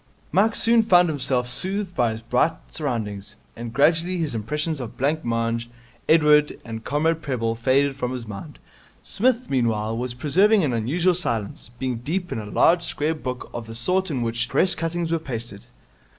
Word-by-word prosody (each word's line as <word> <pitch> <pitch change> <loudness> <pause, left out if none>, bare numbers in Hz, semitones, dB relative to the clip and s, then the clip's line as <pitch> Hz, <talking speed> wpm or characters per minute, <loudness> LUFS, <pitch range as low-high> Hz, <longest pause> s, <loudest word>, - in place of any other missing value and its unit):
Mike 210 +6 +3
soon 230 0 +4
found 180 -5 +5
himself 130 -4 0
soothed 190 +7 -2
by 120 -2 +2
his 110 0 -5
bright 125 +7 +2 0.2
surroundings, 110 - -4 0.2
and 120 0 -6
gradually 165 +7 +2
his 160 -6 -2
impressions 150 +8 -2
of 120 -4 -7
blancmange, 115 -5 -1 0.4
Edward, 150 -2 +4
and 110 -1 -6
Comrade 160 +4 0
Prebble 115 -5 -1
faded 135 +4 +2
from 125 -2 -3
his 125 -2 -5
mind. 100 -3 -8 0.5
Psmith, 250 +3 +1
meanwhile, 115 -4 0
was 120 +1 -3
preserving 190 - +3
an 135 -5 0
unusual 160 +11 +1
silence, 115 - -3
being 130 -2 -2
deep 175 +9 -3
in - - -2
a 105 - -6
large 165 - +4
square 155 -1 -1
book 130 -5 -6
of 115 -1 -6
the 115 - -8
sort 180 +11 0
in 130 -6 -1
which 120 +1 -1
Press 185 - +3
cuttings 165 0 -2
are 165 - +1
pasted. 115 -8 -7
135 Hz, 170 wpm, -23 LUFS, 115-165 Hz, 0.5 s, found